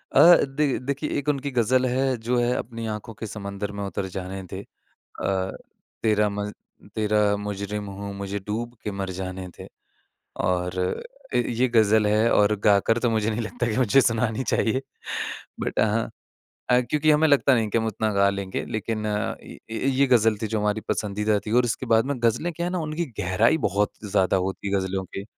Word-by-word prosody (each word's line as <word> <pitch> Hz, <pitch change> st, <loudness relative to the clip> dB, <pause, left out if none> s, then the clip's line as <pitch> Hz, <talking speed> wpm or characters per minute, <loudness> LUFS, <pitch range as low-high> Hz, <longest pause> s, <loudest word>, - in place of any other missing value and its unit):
अ, 175 Hz, +1 st, +9 dB
देख 140 Hz, 0 st, 0 dB
देखिए 140 Hz, +3 st, -2 dB
एक 145 Hz, +1 st, -1 dB
उनकी 140 Hz, -1 st, -1 dB
ग़ज़ल 125 Hz, +1 st, +2 dB
है 130 Hz, +1 st, +1 dB
जो 125 Hz, 0 st, +2 dB
है 120 Hz, +1 st, +2 dB
अपनी 115 Hz, 0 st, -5 dB
आँखों 105 Hz, +2 st, -7 dB
के 110 Hz, -, -4 dB
समंदर 100 Hz, -1 st, -5 dB
में 100 Hz, 0 st, -5 dB
उतर 100 Hz, 0 st, -3 dB
जाने 95 Hz, +1 st, -4 dB
दे 95 Hz, +1 st, -7 dB, 0.6 s
अ, 95 Hz, -1 st, 0 dB, 0.5 s
तेरा 105 Hz, -1 st, +3 dB
मज़ 105 Hz, 0 st, -3 dB, 0.4 s
तेरा 105 Hz, -1 st, +2 dB
मुजरिम 105 Hz, 0 st, -4 dB
हूँ, 100 Hz, +1 st, -6 dB
मुझे 100 Hz, +1 st, -4 dB
डूब 115 Hz, +5 st, -4 dB
के 105 Hz, -, -2 dB
मर 100 Hz, -1 st, -4 dB
जाने 95 Hz, 0 st, -5 dB
दे। -, -, -9 dB, 0.7 s
और 90 Hz, 0 st, 0 dB
अ, -, -, -4 dB
ये 125 Hz, +2 st, +1 dB
ग़ज़ल 110 Hz, -2 st, +4 dB
है 110 Hz, +2 st, +3 dB
और 105 Hz, +1 st, +4 dB
गाकर 105 Hz, +3 st, +4 dB
तो 120 Hz, 0 st, +1 dB
मुझे 110 Hz, -1 st, +1 dB
नहीं 110 Hz, +1 st, -2 dB
लगता 120 Hz, +2 st, -2 dB
कि 105 Hz, -, -2 dB
मुझे 130 Hz, +1 st, +5 dB
सुनानी 115 Hz, -1 st, +1 dB
चाहिए। 115 Hz, +3 st, +1 dB, 0.8 s
बट -, -, -1 dB
हाँ 110 Hz, +1 st, +1 dB, 0.6 s
अ, 125 Hz, -, +6 dB
क्योंकि 150 Hz, +1 st, +3 dB
हमें 155 Hz, +1 st, +4 dB
लगता 140 Hz, -2 st, +5 dB
नहीं 115 Hz, -2 st, +1 dB
कि 115 Hz, -, +2 dB
हम 115 Hz, -, -1 dB
उतना 110 Hz, 0 st, -1 dB
गा 100 Hz, 0 st, +4 dB
लेंगे 100 Hz, -1 st, -4 dB
लेकिन 110 Hz, 0 st, -3 dB
अ, 105 Hz, 0 st, -1 dB
ये -, -, -12 dB, 0.3 s
ये 135 Hz, +1 st, +3 dB
ग़ज़ल 115 Hz, -4 st, +4 dB
थी -, -, +1 dB
जो 110 Hz, -1 st, -1 dB
हमारी 105 Hz, +1 st, 0 dB
पसंदीदा 105 Hz, 0 st, 0 dB
थी 110 Hz, -, -3 dB
और 125 Hz, -, +4 dB
उसके 120 Hz, +2 st, -2 dB
बाद 110 Hz, +2 st, +4 dB
में 140 Hz, -, -1 dB
ग़ज़लें 160 Hz, +10 st, +1 dB
क्या 170 Hz, +2 st, -3 dB
है 180 Hz, -, -2 dB
ना 185 Hz, -, -1 dB
उनकी 165 Hz, +3 st, -2 dB, 0.2 s
गहराई 105 Hz, -, +3 dB
बहुत 100 Hz, +2 st, 0 dB
ज़्यादा 95 Hz, -2 st, +2 dB
होती 95 Hz, +2 st, -2 dB
है 100 Hz, -, -1 dB
ग़ज़लों 95 Hz, 0 st, -2 dB
की। 95 Hz, +2 st, -7 dB
110 Hz, 195 wpm, -25 LUFS, 100-125 Hz, 0.8 s, अ